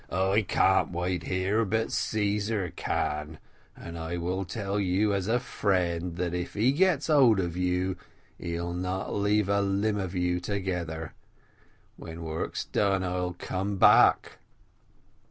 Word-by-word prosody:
"I 95 +4 +2
can't 95 -1 +2
wait 90 0 -2
here, 95 +4 +1
but 110 +2 -1
Caesar 105 -3 -1
can, 75 +1 -2 0.4
and 85 0 -8
I 80 +2 -4
will 90 +3 -2
tell 100 +2 -3
you, 100 +2 +1
as 95 -1 -1
a 120 +2 +2
friend, 90 -7 -1
that 85 0 -2
if 90 0 -4
he 115 +5 +3
gets 165 -1 +2
hold 130 -9 +5
of 85 -2 -2
you, 90 +1 0 0.4
he'll 85 0 -3
not 90 +2 -3
leave 105 0 +1
a 100 0 +2
limb 100 +2 0
of 95 -1 -4
you 90 0 0
together 90 -4 -4 0.8
when 85 0 -8
work's 80 0 -3
done 95 -2 +1
I'll 90 0 -2
come 95 +3 -3
back." - - +5
95 Hz, 140 wpm, -28 LUFS, 90-100 Hz, 0.8 s, hold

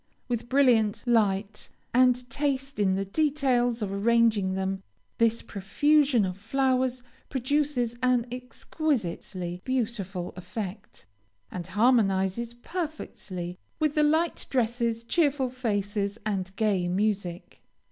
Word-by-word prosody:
With 240 -1 -3
brilliant 245 -6 +3
light, 210 -3 +1 0.2
and 250 0 +4
taste 275 -1 -2
in 190 -2 +3
the 195 +1 -1
details 250 -2 +1
of 195 -1 -3
arranging 215 -2 +3
them, 190 0 -2 0.4
this 230 0 +2
profusion 270 +4 +2
of 185 +1 -5
flowers 255 +2 0 0.3
produces 265 -2 0
an 250 -2 +3
exquisitely 225 - -3
beautiful 210 -8 -2
effect, 185 - -7 0.5
and 175 -1 -5
harmonizes 215 0 +2
perfectly 240 - -6 0.2
with 305 -2 +1
the 300 - +2
light 315 +3 +1
dresses, 235 -2 0
cheerful 280 -2 +1
faces, 205 -4 -2
and 190 -2 -2
gay 200 -5 +1
music. 190 -2 -2
230 Hz, 105 wpm, -27 LUFS, 195-260 Hz, 0.5 s, and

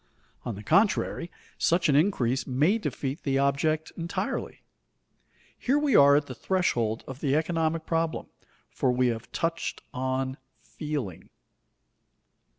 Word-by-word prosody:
On 115 - -3
the 105 - -9
contrary, 195 - +2 0.3
such 170 +1 +3
an 145 - +3
increase 135 - +2
may 150 - +2
defeat 140 -7 -3
the 135 -1 0
object 140 +3 +1
entirely. 170 0 -4 0.9
Here 270 +3 +1
we 295 -5 +2
are 140 0 +8
at 145 0 +2
the 130 - -7
threshold 120 - 0
of 135 0 -7
the 140 -2 +1
economic 160 0 0
problem, 165 -1 -1 0.5
for 130 - +1
we 125 0 +2
have 115 -1 -5
touched 165 0 -2
on 130 +1 -2 0.2
"feeling." 115 - -5
145 Hz, 130 wpm, -27 LUFS, 130-165 Hz, 0.9 s, are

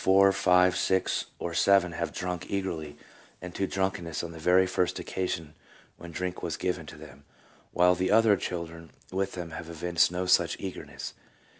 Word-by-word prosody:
four, 95 +1 +6
five, 90 -1 +4
six, 95 0 +1
or 85 - -4
seven 95 +1 +4
have 85 -1 -3
drunk 90 -1 -4
eagerly 80 -7 -3 0.4
and 90 -1 -8
to 95 - -1
drunkenness 95 -5 -2
on 85 - -5
the 80 - -10
very 90 +3 +4
first 90 -1 0
occasion 85 -4 -3 0.4
when 85 0 -10
drink 90 +2 -4
was 80 -2 -3
given 90 -3 -2
to - - -9
them, 75 -2 -13 0.5
while 90 +1 +4
the 90 +1 -1
other 110 -1 +5
children 85 -3 -5 0.2
with 95 +1 -1
them 85 -2 -6
have 80 - -7
evinced 85 -1 +1
no 90 +1 -2
such 90 - +3
eagerness." 95 -2 -7
90 Hz, 170 wpm, -28 LUFS, 85-95 Hz, 0.5 s, four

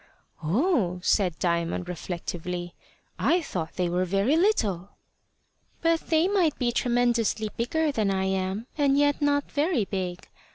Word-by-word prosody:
"Oh!" 195 - +1
said 180 -6 +2
Diamond 170 +1 -1
reflectively; 175 0 -5 0.5
"I 350 - +3
thought 165 - -4
they 180 -1 0
were 180 +1 0
very 195 - +1
little." 215 - +1 0.9
"But 330 0 +1
they 320 +2 +3
might 370 -7 +2
be 245 -2 0
tremendously 235 -3 +1
bigger 305 +6 0
than 215 -6 0
I 190 -1 0
am, 190 +3 -1
and 280 -1 +3
yet 290 +1 +2
not 285 0 +1
very 290 - +1
big. 185 -2 -4
215 Hz, 135 wpm, -26 LUFS, 180-290 Hz, 0.9 s, I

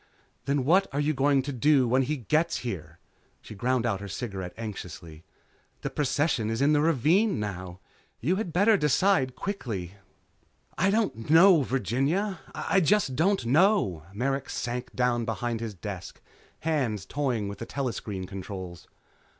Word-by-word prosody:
"Then 140 -2 0
what 185 +6 +4
are 140 - -2
you 150 +1 +1
going 135 0 +2
to 140 +1 -4
do 135 +1 +3
when 130 +3 +3
he 150 +4 -1
gets 155 +7 +1
here?" 85 -8 -5 0.4
She - - -11
ground 120 +3 0
out 100 -5 0
her 100 - -7
cigarette 95 -1 -5
anxiously. 90 -7 -8 0.6
"The - - -4
procession 145 -5 0
is 115 - -2
in 145 +2 +4
the 145 - +3
ravine 165 - +3
now. 95 -3 -5 0.4
You 170 +11 +1
had 210 -5 -3
better 205 +6 +4
decide 150 -4 +2
quickly." 110 - -4 0.8
"I 190 - +2
don't 195 - -1
know, 165 +1 +7
Virginia. 135 - 0 0.2
I 195 - +1
just 185 -6 +2
don't 190 +1 +2
know." 140 - +2
Merrick 135 +6 -2
sank 125 +1 -4
down 125 -1 +1
behind 115 +1 -2
his 110 -3 -5
desk, 95 -1 -7 0.4
hands 130 - -1
toying 125 -7 -1
with 100 - -7
the 115 - -6
telescreen 115 -8 -4
controls. 95 -2 -8
130 Hz, 150 wpm, -27 LUFS, 105-155 Hz, 0.8 s, know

